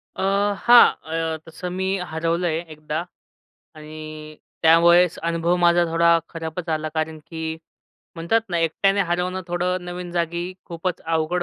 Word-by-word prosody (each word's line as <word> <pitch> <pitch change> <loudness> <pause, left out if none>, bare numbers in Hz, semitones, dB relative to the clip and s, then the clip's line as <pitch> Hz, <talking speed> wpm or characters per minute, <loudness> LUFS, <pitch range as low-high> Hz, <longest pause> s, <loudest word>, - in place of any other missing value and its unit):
अ, - - -5 0.4
हां, 240 0 +9 0.5
अ, - - -4
तसं 165 +2 -7
मी 190 - -1
हरवलं 170 0 -1
आहे 160 -1 0
एकदा 150 0 -5 0.8
आणि 155 0 -9 0.3
त्यावेळेस 170 +2 +5
अनुभव 170 +1 0
माझा 175 0 +5
थोडा 170 0 +3 0.2
खराबच 165 +1 -6
आला. 155 -1 -1
कारण 155 0 -2
की 160 -1 -5 0.6
म्हणतात 170 +7 +1
ना, 170 - 0
एकट्याने 195 +5 +1
हरवणं 180 +2 -1
थोडं 180 +1 -1
नवीन 180 0 -6
जागी 170 0 -1 0.2
खूपच 175 +1 -4
अवघड 165 +2 0
170 Hz, 135 wpm, -22 LUFS, 160-180 Hz, 0.8 s, हां